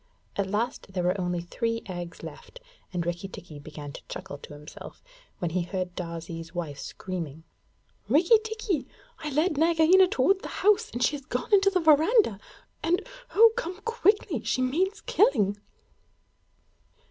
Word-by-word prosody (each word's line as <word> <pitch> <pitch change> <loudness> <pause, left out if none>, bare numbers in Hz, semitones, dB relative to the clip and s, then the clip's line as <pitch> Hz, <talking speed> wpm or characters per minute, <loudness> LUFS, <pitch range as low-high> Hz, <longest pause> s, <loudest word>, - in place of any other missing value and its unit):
At 200 -1 -1
last 210 -1 -2
there 180 -2 -1
were 180 +2 +1
only 180 -1 -1
three 230 +6 -2
eggs 175 -3 -7
left, - - -10 0.3
and 175 -2 -2
Rikki 175 +3 -3
tikki 165 -5 -10
began 145 0 -8
to - - -10
chuckle 145 - -7
to - - -11
himself, 150 +1 -11 0.3
when 175 -2 -2
he 180 +2 0
heard 180 0 -3
Darzee's 165 -1 -6
wife 155 -5 -4
screaming: 165 -4 -6 0.7
'Rikki 340 - +6
tikki, 435 - -2 0.3
I 310 -2 -4
led 305 +2 +1
Nagaina 335 +3 +6
toward 375 +6 +2
the - - -6 0.2
house, 420 +2 +4
and 240 +1 -2
she 285 - +2
has 275 - -14
gone 250 - -3
into 395 0 +6
the 370 -2 +1
verandah, 315 - +4 0.4
and 355 +7 0 0.3
oh, 455 +2 +8
come 380 -6 -4
quickly 415 - +1
she 255 - 0
means 365 +11 0
killing!' 225 - +3
245 Hz, 155 wpm, -27 LUFS, -, 0.7 s, oh